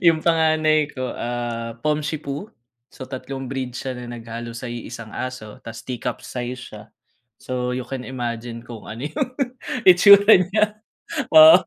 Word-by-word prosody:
yung 160 -1 +5
panganay 155 -2 +3
ko, 130 -3 -4
ah, 120 -1 -4
Pomshipu. 150 +3 -2 0.4
So, 130 - -9
tatlong 135 +1 -6
breed 130 -1 -4
siya 130 0 -3
na 125 -1 -8
naghalo 115 0 -7
sa 120 0 -5
iisang 115 -1 -7
aso. 130 -5 -6
'Tas 115 0 -9
tea 125 -2 -5
cup 125 -2 -4
size 125 0 -4 0.2
siya. 105 -1 -9 0.6
So, 125 -1 -3
you 125 - -3
can 130 -2 -5
imagine 120 -2 -4
kung 115 -3 -10
ano 115 +5 -6
yung 250 - -2 0.6
itsura 200 +3 +8
niya. 210 +3 +2 0.5
Oo. 315 +1 +10
130 Hz, 150 wpm, -22 LUFS, 120-155 Hz, 0.6 s, Oo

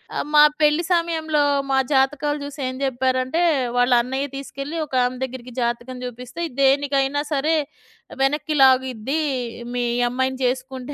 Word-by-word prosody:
ఆహ్, - - -2
మా 295 - +9 0.2
పెళ్లి 300 +2 +3
సమయంలో 320 -3 +1 0.3
మా 265 - +3 0.2
జాతకాలు 290 +2 +1
జూసి 285 0 -8
ఏం 255 - -4
జెప్పారంటే 260 +3 0 0.4
వాళ్ళ 245 +1 +3
అన్నయ్య 265 +3 -3
తీసుకెళ్ళి 275 +3 -6
ఒకామె 255 -2 0
దగ్గరికి 255 -1 -7
జాతకం 240 +2 -3
జూపిస్తే, 250 +4 -8
"ఇది 245 - -17
దేనికైనా 275 +1 +2
సరే 300 +3 +1 0.7
వెనక్కి 295 +3 0
లాగిద్ది 260 +1 +2 0.6
మీ 245 0 0 0.2
అమ్మాయిని 260 +1 -1
చేసుకుంటే" 255 +2 -3
265 Hz, 130 wpm, -22 LUFS, 255-290 Hz, 0.7 s, మా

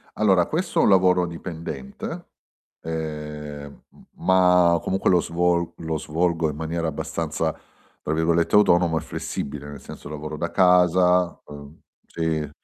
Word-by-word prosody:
Allora 95 -5 +3
questo 175 +5 -1
è - - +5
un - - +4
lavoro 90 -2 +4
dipendente, 80 -5 -7 0.5
ehm, 75 -2 -6
m - - -20 0.2
ma 90 -2 +4
comunque 95 +1 0
lo 90 -2 +5
svol 85 0 0
lo 80 -1 -3
svolgo 80 +1 0
in 75 - -5
maniera 80 +1 -3
abbastanza, 75 - -3 0.5
tra 75 - -2
virgolette 80 +2 +1
"autonomo 85 -5 +4
e - - -2
flessibile", 75 +1 -5
nel 70 - -9
senso - - -10
lavoro 75 0 -6
da 85 +3 -2
casa, 90 -1 +3
uhm 70 +1 -12 0.3
sì. 80 -3 -2
85 Hz, 140 wpm, -23 LUFS, 75-90 Hz, 0.5 s, è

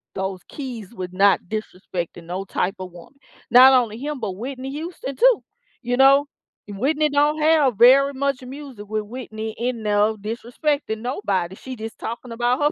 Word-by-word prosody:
those 190 -1 -3
keys 240 -7 -7
with 180 -1 -6
not 195 +1 +4
disrespecting 180 -5 -5
no 180 +3 -4
type 195 +1 -1
of 185 -1 -7
woman. 175 +11 -15 0.3
Not 255 +2 +9
only 235 -4 +2
him, 290 +1 -4
but 215 -5 -3
Whitney 255 +6 -6
Houston 295 -3 -6
too, - - +4 0.4
you 245 +1 0
know? 275 +2 +6 0.4
Whitney 290 +9 0
don't 295 +2 +2
have 300 -7 +3
very 270 +4 +6
much 275 0 -1
music 260 -5 -9
with 215 0 -1
Whitney 220 -1 -6
in 240 -1 -2
no 210 +1 +2
disrespecting 235 +3 -2
nobody; 200 -8 -2
she 260 +5 -8
just 220 0 -7
talking 235 +1 -6
about 240 +3 +1
her 295 0 +2
240 Hz, 165 wpm, -22 LUFS, 205-275 Hz, 0.4 s, Not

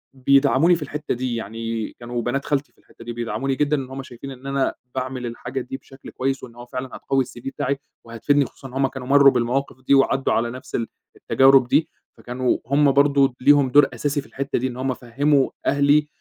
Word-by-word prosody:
بيدعموني 140 +5 +4
في 165 - -7
الحتّة 150 +2 -4
دي 125 -1 -2
يعني 115 0 -4
كانوا 120 0 -4
بنات 135 +4 -2
خالتي 145 -1 -1
في - - -41
الحتّة 115 - -17
دي 120 - -5
بيدعموني 120 +3 -2
جدًا 150 +2 +1
إن 130 -2 -5
هُم 135 0 -6
شايفين 130 +2 -10
إن 130 +1 -10
أنا 135 -1 0 0.2
باعمل 130 -1 -3
الحاجة 125 +2 -5
دي 125 +2 -6
بشكل 135 0 -14
كويس 135 +1 -2
وإن 115 -1 -10
هو 120 - -10
فعلًا 130 +1 -6
هتقوّي 135 -1 0
الCV 120 -1 -12
بتاعي 140 0 -2 0.3
وهتفيدني 135 +5 +1
خصوصًا 135 - -11
هُم 135 0 +2
كانوا 130 -1 -8
مرّوا 140 0 +7
بالمواقف 125 +2 -1
دي، - - +5
وعدّوا 135 0 +2
على 120 0 0
نفس 130 +1 -8
ال 115 - -1 0.3
التجارب 135 -1 +4
دي، 155 +5 +2 0.3
فكانوا 125 +1 -1
هُم 140 +1 +4
برضه 140 -2 +3
ليهم 145 -1 +5
دور 145 +1 +6
أساسي 145 +4 -1
في - - -17
الحتّة 135 -2 -3
دي 130 - -1
إن 125 - -7
هُم 130 0 -1
فهّموا 135 +4 +1 0.2
أهلي 145 +1 +3
135 Hz, 205 wpm, -22 LUFS, 125-140 Hz, 0.3 s, مرّوا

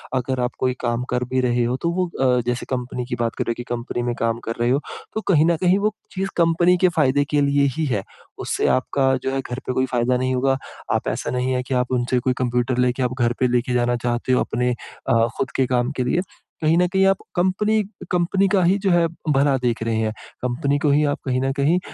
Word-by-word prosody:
अगर 130 0 -1
आप 125 0 0
कोई 130 -1 +1
काम 120 0 -1
कर 125 0 0
भी 130 - +2
रहे 120 -1 +1
हो, 125 +2 -1
तो 170 - 0
वो 180 0 0
अ, 125 -1 +3
जैसे 125 0 -1
कंपनी 125 -1 -3
की 120 - -3
बात 115 0 -1
कर - - -1
रहे - - 0
हो - - -2
कि 120 - -5
कंपनी 120 0 -4
में 120 0 -1
काम 115 0 0
कर 115 - -3
रहे 120 - +2
हो, 140 +3 +2 0.3
तो 220 - -2
कहीं 155 +1 +5
न 170 -2 +2
कहीं 185 +2 +4
वो 210 +1 +1 0.2
चीज़ 195 0 -2
कंपनी 170 +2 +4
के 185 - +5
फ़ायदे 145 -1 +3
के 145 - +3
लिए 140 0 +3
ही 160 - 0
है। 105 -8 -1 0.4
उससे - - 0
आपका 135 +1 +1
जो 135 - -1
है, 135 - 0
घर 125 0 -6
पे 130 - 0
कोई 130 +1 +1
फ़ायदा 125 0 +1
नहीं 130 +1 0
होगा। 135 +1 +2 0.4
आप - - -2
ऐसा - - -3
नहीं 125 +1 -1
है 125 0 -1
कि 130 - -4
आप 125 0 0
उनसे 125 0 +1
कोई 125 +1 0
कंप्यूटर 125 0 0
लेके 125 +1 +1
आप 125 0 0
घर 120 0 +2
पे 130 - +3
लेके 125 0 0
जाना 120 0 +2
चाहते 120 +1 0
हो, - - +3
अपने 125 0 0 0.4
अ, 115 0 +4
खुद 135 - -2
के 130 - +3
काम 125 0 +1
के 125 - +1
लिए। 125 - -1 0.5
कहीं 160 +2 +3
न 180 0 +4
कहीं 190 +2 +2
आप 195 - +3 0.2
कंपनी 210 +4 +2 0.3
कंपनी 180 +3 +2
का 195 -2 +3
ही 185 +3 +3
जो 195 -1 +1
है, 170 -1 +4 0.2
भला 140 -1 +3
देख 115 -2 0
रहे 115 -1 -1
हैं। 110 -1 0 0.3
कंपनी 125 +3 0
को 150 - +1
ही 145 +2 +3
आप 145 0 -1
कहीं 130 -1 0
न 135 0 0
कहीं 145 +6 +2
130 Hz, 255 wpm, -22 LUFS, 125-155 Hz, 0.5 s, कहीं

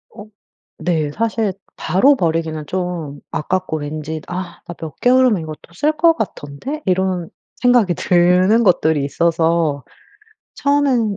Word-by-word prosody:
어 210 -2 -9 0.6
네 160 -4 0
사실 225 -1 -1 0.2
바로 195 - +3
버리기는 160 - -1
좀 175 -5 -4
아깝고 185 0 -2
왠지 155 +1 -5
'아 180 -1 -6
나 175 - -7
몇 160 -2 -8
개월이면 245 -7 +4
이것도 155 +2 -10
쓸 300 - +1
거 330 +1 +5
같던데?' 220 - -5
이런 185 -2 0 0.3
생각이 240 -7 +3
드는 180 +7 +3
것들이 160 -6 +2
있어서 165 -2 +1 0.7
처음엔 270 -7 +1
180 Hz, 255 characters per minute, -18 LUFS, 160-225 Hz, 0.7 s, 거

